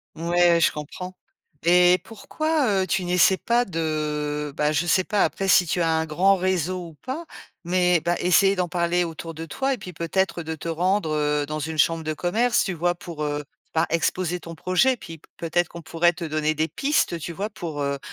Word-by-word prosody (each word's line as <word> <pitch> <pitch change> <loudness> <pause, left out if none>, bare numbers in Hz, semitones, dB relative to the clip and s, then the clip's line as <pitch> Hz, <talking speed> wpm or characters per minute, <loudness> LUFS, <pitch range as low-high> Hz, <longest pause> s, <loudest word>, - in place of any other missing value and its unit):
Ouais, 170 +1 +3
je - - +4
comprends. 180 +5 -7 0.5
Et 180 +1 +5
pourquoi, 250 -3 -1
heu, - - -5
tu 190 +1 0
n'essaies 180 +2 +4
pas 240 +1 +1
de, 150 -3 -2
bah, 150 0 +1
je 155 +3 0
sais 185 +2 +3
pas 210 0 +1
après 195 - -1
si 180 -1 +5
tu 175 +2 -1
as 165 - +2
un 160 0 +1
grand 185 +6 +3
réseau 180 -1 -1
ou - - -15
pas, 300 +6 -4 0.4
mais, 180 0 +2
bah, 175 0 0
essayer 195 +3 +4
d'en 180 -1 0
parler 175 0 +1
autour 165 0 -6
de 160 +1 -7
toi 270 - -1
et - - -3
puis, 180 -3 -9
peut-être, 170 +1 -1
de 160 0 -4
te 160 - -8
rendre, 180 0 0
heu, 150 -1 0
dans 155 0 -3
une 160 +1 -4
chambre 165 +3 +2
de 155 0 -2
commerce, 225 +10 +1
tu 190 - -2
vois? 175 +1 0
Pour, 165 -3 -7
heu, 145 0 -2 0.3
ben, 160 +1 +2
exposer 180 +1 0
ton 165 -1 -9
projet, 185 +10 +2
puis 165 -5 -10 0.2
peut-être 170 +1 0
qu'on 170 - -9
pourrait 170 +2 +2
te 175 0 -8
donner 155 0 -1
des 155 +1 0
pistes, 275 - 0
tu 170 - -5
vois? 205 +6 -3
Pour 165 -7 -6
heu, 140 0 -1
175 Hz, 210 wpm, -24 LUFS, 160-185 Hz, 0.5 s, Et